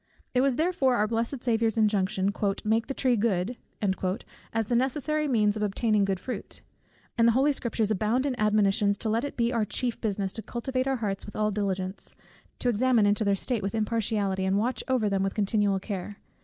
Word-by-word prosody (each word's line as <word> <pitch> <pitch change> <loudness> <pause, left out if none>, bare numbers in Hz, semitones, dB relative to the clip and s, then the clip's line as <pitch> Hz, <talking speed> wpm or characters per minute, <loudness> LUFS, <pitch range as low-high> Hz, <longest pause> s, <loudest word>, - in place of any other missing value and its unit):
It 250 - +3
was 270 -1 +2
therefore 305 -5 +2
our 215 -2 +2
blessed 235 +3 -2
Saviour's 225 -2 +1
injunction, 200 -2 +1 0.3
"Make 220 +1 +1
the 275 - -4
tree 255 -2 +2
good" 210 0 0 1.0
as 225 -1 0
the 240 - 0
necessary 295 +4 0
means 215 -5 +2
of 215 - -4
obtaining 210 0 +1
good 195 -2 -1
fruit; 250 +7 -6 0.6
and 230 - +6
the 235 - +5
holy 275 +4 +3
Scriptures 225 -4 -1
abound 215 +6 +1
in 280 - 0
admonitions, 205 -1 +3
to 220 - -2
let 225 +3 +1
it 285 - -5
be 235 +1 +1
our 230 -2 +1
chief 240 +3 -2
business 200 -3 -1
to 220 - -5
cultivate 255 +3 -3
our 270 - +1
hearts 205 -5 -3
with 210 - -9
all 215 0 +1
diligence, 195 -2 -3 0.4
to - - -2
examine 240 -1 +3
into 205 +2 +2
their 200 -1 +2
state 230 +3 -2
with 195 +2 -3
impartiality, 215 -3 0
and 190 +1 +1
watch 240 +5 -1
over 255 -5 +1
them 195 -1 0
with 195 0 -1
continual 205 -1 +1
care. 200 0 -5
220 Hz, 195 wpm, -27 LUFS, 200-245 Hz, 1.0 s, and